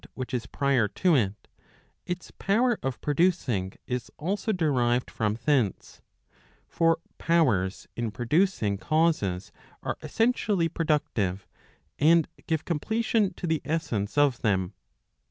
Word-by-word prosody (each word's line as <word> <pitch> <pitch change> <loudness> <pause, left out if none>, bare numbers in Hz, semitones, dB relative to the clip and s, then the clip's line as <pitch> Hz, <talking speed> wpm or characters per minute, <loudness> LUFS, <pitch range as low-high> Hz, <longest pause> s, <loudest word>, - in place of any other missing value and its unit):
which 130 -1 -5
is 120 -2 -2
prior 135 -6 +1
to 175 - +2
it, 105 -5 -1 0.6
its 180 0 -5
power 230 +4 +1
of 135 -2 -3
producing 145 - +1
is 125 -2 -3
also 195 +7 -1
derived 125 - +1
from 105 -1 -1
thence; 130 - 0 0.7
for 165 -1 +2 0.2
powers 120 - +1
in 120 -1 -2
producing 120 - +1
causes 155 - +1 0.3
are - - -3
essentially 220 -7 +1
productive, 130 - -1 0.5
and 160 +1 +5 0.2
give 160 -2 -1
completion 220 +5 0
to - - -5
the 160 -3 0
essence 145 -10 -2
of 145 -4 +3
them. 95 -5 0
145 Hz, 120 wpm, -27 LUFS, 110-170 Hz, 0.7 s, and